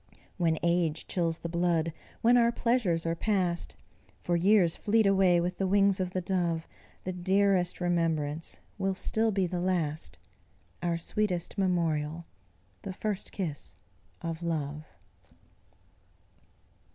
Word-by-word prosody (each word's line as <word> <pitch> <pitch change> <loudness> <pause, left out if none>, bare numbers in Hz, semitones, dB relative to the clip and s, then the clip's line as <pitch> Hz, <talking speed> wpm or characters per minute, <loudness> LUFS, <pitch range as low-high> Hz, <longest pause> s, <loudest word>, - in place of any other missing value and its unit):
When 165 -3 +2
age 170 -2 +1
chills 165 -3 -1
the 170 - -5
blood, 170 -1 +1 0.3
when 240 +2 +5
our 235 -1 +5
pleasures 230 -10 +1
are 165 - +1
past 180 -2 -1 0.4
For 175 - -1
years 180 -1 +4
fleet 220 +1 +2
away 190 -3 +4
with 175 +1 -2
the 195 - +1
wings 200 0 +3
of 185 -1 -1
the 185 0 -2
dove 175 -3 -1 0.4
The 185 - -3
dearest 190 0 +2
remembrance 165 -3 -1 0.2
will 195 0 0
still 220 +3 +1
be 190 -2 +1
the 175 0 -3
last, 160 - -1 0.6
Our 170 -1 0
sweetest 180 0 -1
memorial 170 -4 0 0.6
the 195 - -5
first 205 0 -3
kiss 150 - -5 0.5
of 165 0 -4
love. 155 -3 -3
175 Hz, 125 wpm, -29 LUFS, 165-195 Hz, 0.6 s, when